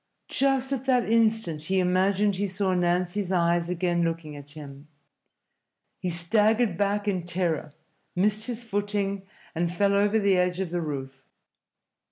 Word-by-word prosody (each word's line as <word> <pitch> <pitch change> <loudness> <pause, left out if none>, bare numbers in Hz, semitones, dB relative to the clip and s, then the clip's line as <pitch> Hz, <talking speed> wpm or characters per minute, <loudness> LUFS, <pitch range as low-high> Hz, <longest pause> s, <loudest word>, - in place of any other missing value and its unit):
Just 270 0 +1
at 265 -1 -3
that 250 -3 +2
instant 220 -9 +1
he 190 +3 0
imagined 190 +2 +2
he 200 +1 0
saw 190 0 -1
Nancy's 180 +2 0
eyes 170 -1 +2
again 175 -1 0
looking 165 -3 -2
at 145 0 -11
him. 145 -1 -10 1.1
He 180 - -2
staggered 210 +5 +2
back 205 +2 0
in 185 -4 0
terror, 170 -4 -2 0.4
missed 210 +4 +1
his 240 -1 -4
footing, 200 -2 -2 0.3
and 170 +1 -1
fell 200 +3 +2
over 205 +2 +3
the 200 -3 +3
edge 180 0 +1
of 190 -3 -3
the 175 -1 -1
roof. 135 -3 -6
185 Hz, 150 wpm, -26 LUFS, 170-205 Hz, 1.1 s, over